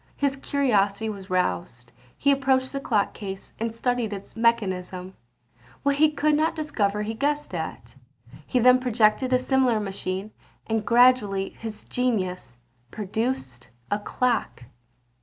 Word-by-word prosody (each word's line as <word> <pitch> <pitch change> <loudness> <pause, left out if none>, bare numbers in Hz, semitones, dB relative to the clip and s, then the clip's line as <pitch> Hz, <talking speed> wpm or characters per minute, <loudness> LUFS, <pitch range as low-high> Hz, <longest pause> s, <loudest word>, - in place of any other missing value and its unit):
His 280 -1 0
curiosity 220 -7 +1
was 200 -2 -8
roused; 115 - -2 0.3
he 280 - +3
approached 265 -1 +2
the 275 - -2
clock 215 -7 0
case, 195 -2 -8
and 230 +1 -1
studied 235 -1 -1
its 200 -1 -8
mechanism; 190 -5 0 0.7
what 280 0 +2
he 310 +1 +5
could 300 0 +1
not 310 +2 +2
discover 210 -10 -1
he 220 +1 -3
guessed 290 +1 -1
at. 160 -8 -5 0.5
He - - 0
then 250 +1 +6
projected 245 0 +2
a 255 - +5
similar 255 -3 +2
machine; 195 0 -4 0.3
and 225 -1 -1
gradually 235 -5 +4
his 220 -2 -8
genius 185 - -2 0.3
produced 200 - -3 0.2
a 205 - +1
clock. 235 - -1
225 Hz, 135 wpm, -25 LUFS, 195-255 Hz, 0.7 s, then